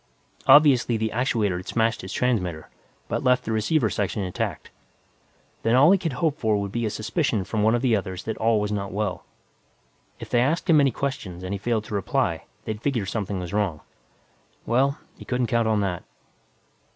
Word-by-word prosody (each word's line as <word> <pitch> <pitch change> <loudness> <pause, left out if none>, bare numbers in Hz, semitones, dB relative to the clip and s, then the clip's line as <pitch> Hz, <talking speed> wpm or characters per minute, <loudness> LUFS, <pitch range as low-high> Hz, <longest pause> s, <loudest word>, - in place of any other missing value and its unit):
Obviously, 135 -4 +6
the 110 0 -1
actuator 110 -6 0
had 90 +2 -8
smashed 115 -1 0
his 95 - -8
transmitter, 90 -12 -1 0.4
but - - -2
left 125 0 +3
the 110 - -3
receiver 110 +4 +1
section 100 0 -2
intact. 90 -1 -4 0.9
Then 115 +1 +2
all 145 +7 +7
he 195 - +4
could 165 -6 -2
hope 155 +2 -1
for 110 -2 +1
would 100 -1 -4
be 120 0 -1
a - - -1
suspicion 110 - -1
from 105 +3 -2
one 110 +2 +4
of 120 - -2
the 120 -4 +3
others 95 -2 -4
that 110 - -3
all 110 -1 +2
was 105 0 -2
not 100 -2 -3
well. 100 -2 -3 0.9
If - - -9
they 120 - +3
asked 155 +9 0
him 155 -4 +6
any 140 - +4
questions 115 -9 -4
and 95 +2 -4
he 100 - -3
failed 110 +1 -1
to 110 - -9
reply, 100 - -1 0.2
they'd 110 -1 -4
figure 120 -7 -1
something 100 -1 -3
was 90 0 -6
wrong. 100 -7 -1 0.8
Well, 135 +5 +2 0.2
he - - -9
couldn't 125 0 -1
count 115 0 +1
on 110 -2 +2
that. 90 -4 -2
110 Hz, 195 wpm, -24 LUFS, 100-125 Hz, 0.9 s, all